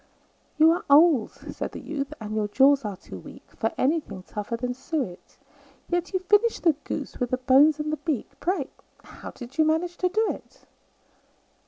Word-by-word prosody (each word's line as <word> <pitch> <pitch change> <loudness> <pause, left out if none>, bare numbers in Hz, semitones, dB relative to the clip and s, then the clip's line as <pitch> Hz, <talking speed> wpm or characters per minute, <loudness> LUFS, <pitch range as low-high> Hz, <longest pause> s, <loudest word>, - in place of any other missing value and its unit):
"You 315 +1 +7
are 345 - -1
old," 290 -5 +6
said - - -7
the - - -6
youth, 280 -2 -4
"and 215 -1 -6
your 215 -1 0
jaws 275 +5 +4
are 205 -3 -4
too - - -10
weak - - -13
For - - -1
anything 260 - -1
tougher 210 +4 -5
than 250 +1 -2
suet; 265 - -5 0.5
Yet 350 0 -1
you 375 - 0
finished 415 +5 +2
the 330 -3 +5
goose, 280 - -5
with 245 - -1
the 255 - 0
bones 275 +4 +5
and 305 0 -2
the - - -1
beak 300 -9 -3
Pray, 345 -7 -1 0.3
how - - -10
did 250 +4 -11
you - - +7
manage 330 +3 0
to 365 - +1
do 435 +4 +1
it?" - - -12
290 Hz, 185 wpm, -25 LUFS, 245-335 Hz, 0.5 s, You